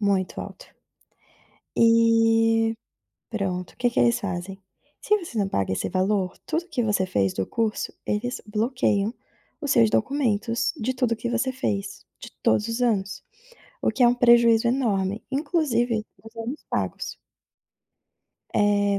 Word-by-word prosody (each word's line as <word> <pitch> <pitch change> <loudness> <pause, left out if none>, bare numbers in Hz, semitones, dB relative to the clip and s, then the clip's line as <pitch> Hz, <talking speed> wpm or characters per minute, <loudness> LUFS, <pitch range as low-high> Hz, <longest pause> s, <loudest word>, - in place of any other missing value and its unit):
muito 195 -3 0
alto. - - -9 1.1
E, 225 0 +4 0.6
pronto, 185 -5 -3
o - - -32
que 245 -1 +1
que - - 0
eles 235 -1 +3
fazem, 190 0 -4 0.4
se 420 - +3
você 325 - -7
não 200 - +1
paga 95 - -1
esse - - -2
valor, 190 0 0
tudo 325 +2 -1
o - - -28
que 285 -7 -1
você 205 -4 +1
fez 100 - +1
do 95 - -2
curso, 220 - -2
eles 245 +4 -2
bloqueiam 215 -1 0 0.5
os 290 - -3
seus 230 -2 +5
documentos 235 -3 0
de 255 +4 -1
tudo 250 -3 +1
que 225 +2 -4
você 240 +2 0
fez, 200 -6 -3 0.2
de - - -10
todos 210 - +2
os 230 +2 -3
anos, 200 -5 0 0.6
o - - +2
que 255 - -4
é - - +8
um 240 - +3
prejuízo 235 -2 +5
enorme, 215 -5 0
inclusive 260 -7 0 0.2
os 225 +1 -14
anos 235 +6 -5
pagos. - - -2 1.4
Eh 205 -1 +2
225 Hz, 150 wpm, -24 LUFS, 200-245 Hz, 1.4 s, é